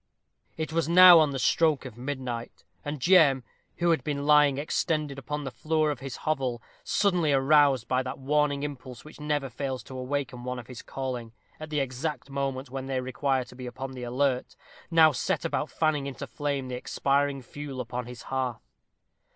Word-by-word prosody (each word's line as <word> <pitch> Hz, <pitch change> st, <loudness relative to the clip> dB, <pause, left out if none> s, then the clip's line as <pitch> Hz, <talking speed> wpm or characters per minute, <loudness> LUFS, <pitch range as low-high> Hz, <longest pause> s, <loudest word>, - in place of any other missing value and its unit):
It 160 Hz, 0 st, -3 dB
was 165 Hz, 0 st, 0 dB
now 180 Hz, 0 st, +10 dB
on 155 Hz, -2 st, +4 dB
the 135 Hz, -, -3 dB
stroke 150 Hz, +2 st, +2 dB
of 125 Hz, -4 st, -8 dB
midnight; 125 Hz, -2 st, -5 dB, 0.2 s
and 145 Hz, 0 st, -4 dB
Jem, 140 Hz, -4 st, +5 dB, 0.3 s
who 175 Hz, 0 st, +2 dB
had 160 Hz, -6 st, +1 dB
been 140 Hz, -1 st, -2 dB
lying 145 Hz, -2 st, +5 dB
extended 150 Hz, -1 st, -1 dB
upon 150 Hz, +2 st, -4 dB
the 135 Hz, -, -5 dB
floor 155 Hz, +1 st, 0 dB
of 140 Hz, -, -5 dB
his 135 Hz, -2 st, -6 dB
hovel, 130 Hz, -6 st, 0 dB, 0.2 s
suddenly 180 Hz, -7 st, +2 dB
aroused 135 Hz, -2 st, +4 dB
by 130 Hz, 0 st, +1 dB
that 130 Hz, +1 st, -5 dB
warning 145 Hz, +1 st, +1 dB
impulse 130 Hz, -3 st, -7 dB
which 155 Hz, -, -13 dB
never 150 Hz, -2 st, -1 dB
fails 130 Hz, +1 st, -4 dB
to 130 Hz, -, -10 dB
awaken 130 Hz, -1 st, -3 dB
one 125 Hz, 0 st, -3 dB
of 120 Hz, -, -8 dB
his 125 Hz, -1 st, -9 dB
calling 125 Hz, -4 st, -5 dB, 0.3 s
at 155 Hz, 0 st, -7 dB
the 150 Hz, -2 st, 0 dB
exact 135 Hz, +1 st, -4 dB
moment 135 Hz, -1 st, -3 dB
when 135 Hz, 0 st, -5 dB
they 135 Hz, -1 st, -1 dB
require 130 Hz, +1 st, 0 dB
to 125 Hz, -, -15 dB
be 125 Hz, 0 st, -7 dB
upon 130 Hz, +2 st, -6 dB
the 130 Hz, -1 st, -8 dB
alert, 125 Hz, +1 st, -1 dB, 0.3 s
now 160 Hz, -2 st, +6 dB
set 125 Hz, -4 st, -1 dB
about -, -, -1 dB
fanning 150 Hz, -3 st, 0 dB
into 140 Hz, +1 st, -6 dB
flame 140 Hz, +2 st, -3 dB
the 130 Hz, -, -6 dB
expiring 140 Hz, +2 st, 0 dB
fuel 140 Hz, +1 st, -7 dB
upon 125 Hz, 0 st, -4 dB
his 125 Hz, -1 st, -9 dB
hearth. 130 Hz, -3 st, -3 dB
135 Hz, 185 wpm, -27 LUFS, 130-150 Hz, 0.3 s, now